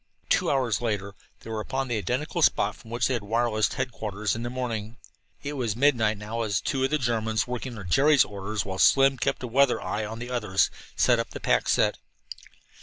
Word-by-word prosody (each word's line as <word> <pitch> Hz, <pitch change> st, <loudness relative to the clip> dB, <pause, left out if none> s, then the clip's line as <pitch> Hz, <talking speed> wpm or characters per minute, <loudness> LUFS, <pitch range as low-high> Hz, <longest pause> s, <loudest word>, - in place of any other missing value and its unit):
Two -, -, +2 dB
hours 125 Hz, -6 st, +1 dB
later 100 Hz, -4 st, -2 dB, 0.3 s
they 115 Hz, -, -9 dB
were 110 Hz, -, -2 dB
upon 130 Hz, +5 st, -3 dB
the 120 Hz, -, -1 dB
identical 95 Hz, -, -2 dB
spot -, -, +3 dB
from 110 Hz, -, -16 dB
which 120 Hz, +1 st, 0 dB
they 130 Hz, -, 0 dB
had 120 Hz, -, -1 dB
wirelessed 110 Hz, +1 st, 0 dB
headquarters 110 Hz, -5 st, -2 dB
in 115 Hz, -, -5 dB
the 120 Hz, -, -3 dB
morning. 120 Hz, -3 st, -4 dB, 0.5 s
It 145 Hz, +1 st, -4 dB
was 120 Hz, -7 st, -2 dB
midnight 115 Hz, -5 st, +2 dB
now 110 Hz, +3 st, -4 dB
as 105 Hz, -3 st, 0 dB
two 135 Hz, -2 st, -1 dB
of 135 Hz, -, +2 dB
the 150 Hz, -, +1 dB
Germans, 110 Hz, -4 st, 0 dB
working 125 Hz, +1 st, -5 dB
under 110 Hz, -4 st, -8 dB
Jerry's 140 Hz, -, +4 dB
orders 100 Hz, 0 st, -4 dB
while 95 Hz, -1 st, -5 dB
Slim 135 Hz, -1 st, +5 dB
kept 135 Hz, +2 st, -1 dB
a -, -, -2 dB
weather 135 Hz, +2 st, +3 dB
eye 110 Hz, -, -3 dB
on 110 Hz, +1 st, -5 dB
the 120 Hz, +2 st, -7 dB
others, 105 Hz, -6 st, +1 dB, 0.2 s
set -, -, +3 dB
up -, -, -2 dB
the -, -, -7 dB
pack -, -, +1 dB
set. -, -, +2 dB
115 Hz, 210 wpm, -26 LUFS, 105-130 Hz, 0.5 s, Slim